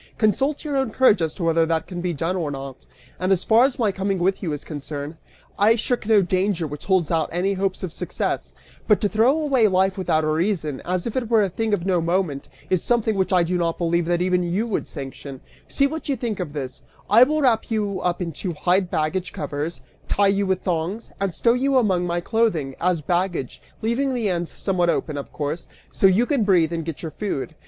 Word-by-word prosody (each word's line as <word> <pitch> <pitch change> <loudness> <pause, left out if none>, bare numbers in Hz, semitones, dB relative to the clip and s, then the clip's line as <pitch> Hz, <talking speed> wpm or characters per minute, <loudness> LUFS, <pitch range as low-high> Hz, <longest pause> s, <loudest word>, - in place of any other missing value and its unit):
Consult 265 - +1
your 290 -2 -2
own 265 -3 +1
courage 215 -5 +4
as 160 -1 -1
to 185 - -5
whether 165 0 +3
that 160 -1 0
can 175 -2 -6
be 180 0 -1
done 165 +3 -2
or 165 -5 -2
not. 135 -2 -8 0.3
And 185 +2 0
as 190 -2 +2
far 230 +3 +5
as 270 0 -1
my 225 -5 +2
coming 195 0 -1
with 185 +2 0
you 170 - -2
is 145 - -4
concerned, 145 0 -6 0.4
I 215 +3 +5
shirk 235 -1 -2
no 215 -3 +5
danger 185 -1 0
which 150 +1 -7
holds 185 -4 +2
out 160 -2 +1
any 185 +3 0
hopes 190 0 -2
of 175 -3 -4
success, - - -3 0.4
but 210 - +4
to 210 - +3
throw 230 +9 +3
away 270 -7 +3
life 190 0 +1
without 160 -4 +1
a - - 0
reason, 155 -3 -1
as 180 0 -1
if 230 - -4
it 245 -4 -1
were 225 -3 +4
a 195 - 0
thing 220 +5 -2
of 190 -4 0
no 180 -3 +2
moment, 170 -4 -1 0.2
is 185 -3 +2
something 230 -2 +1
which 190 0 0
I 180 -2 +4
do 175 +1 -1
not 170 -1 0
believe 170 -1 0
that 175 0 +1
even 180 0 +2
you 180 +6 -1
would 225 - -2
sanction 135 -1 -8 0.3
see 275 - +1
what 310 +2 -4
you 275 - +2
think 230 -6 -3
of 165 -6 -4
this: 130 -4 -6 0.3
I 215 +4 +6
will 300 +4 +4
wrap 230 -4 +2
you 205 -4 -1
up 180 0 -1
in 170 - -4
two 175 +4 -4
hide 180 +4 +1
baggage 175 +4 -1
covers, 150 +3 -4 0.3
tie 200 -1 +3
you 200 0 +1
up - - -4
with 190 -1 +1
thongs, 180 +5 -2
and 195 -1 0
stow 235 +7 +2
you 265 +2 +2
among 185 -7 +2
my 175 0 -1
clothing, 175 - 0
as 180 -2 +1
baggage, 175 -4 -2 0.2
leaving 255 +4 0
the 225 -4 0
ends 175 -2 -1
somewhat 180 -3 0
open, 155 -2 -1
of 140 - -6
course, 150 +3 -4 0.2
so 195 - +4
you 195 +6 +3
can 275 -4 +1
breathe 175 -5 +3
and 165 -2 -3
get 165 -1 -6
your 160 - -4
food. 160 -4 -4
185 Hz, 230 wpm, -23 LUFS, 165-215 Hz, 0.4 s, I